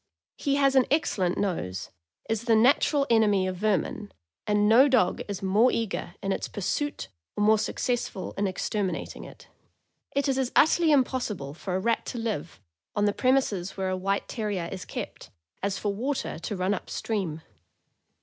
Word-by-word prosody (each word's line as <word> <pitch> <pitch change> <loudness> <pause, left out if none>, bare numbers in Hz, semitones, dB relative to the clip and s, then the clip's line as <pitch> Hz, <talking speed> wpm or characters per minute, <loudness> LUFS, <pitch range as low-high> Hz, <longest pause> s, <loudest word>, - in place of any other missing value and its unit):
He 280 -1 0
has 275 -1 +3
an 260 -2 +4
excellent 195 - +1
nose, 95 - -2 0.4
is 225 +1 -2
the 230 -2 +4
natural 275 +5 +4
enemy 210 -4 +4
of 185 -1 -3
ver 210 0 +3
min, 215 -3 -5 0.4
and 210 0 +3
no 240 +6 +7
dog 240 -10 +2
is 200 -1 -5
more 210 +6 +4
eager 215 -5 -3
in 195 - 0
its - - -2
pursuit 290 +9 -3 0.3
or 210 - +2
more 215 0 +5
suc - - -2
cessful 240 -6 -2
in 200 0 0
exterminating 185 -1 -3
it. - - -14 0.7
It 280 +1 +1
is 270 -1 +1
as 260 -2 0
utterly 320 +1 +5
impossible 245 - 0
for 180 +3 -4
a - - +1
rat 230 +3 +1
to 245 - -4
live, 215 -9 -3 0.4
on 205 - +2
the 205 - +2
premises 235 -9 +1
where 190 -1 -1
a 185 - 0
White 195 +2 -1
Terrier 205 -7 -3
is 190 -2 -6
kept, - - -7 0.3
as 195 0 -1
for 205 0 -1
water 255 - -3
to 205 - -4
run 185 +2 0
up 205 - -5
stream. 180 -8 -3
210 Hz, 180 wpm, -27 LUFS, 190-250 Hz, 0.7 s, no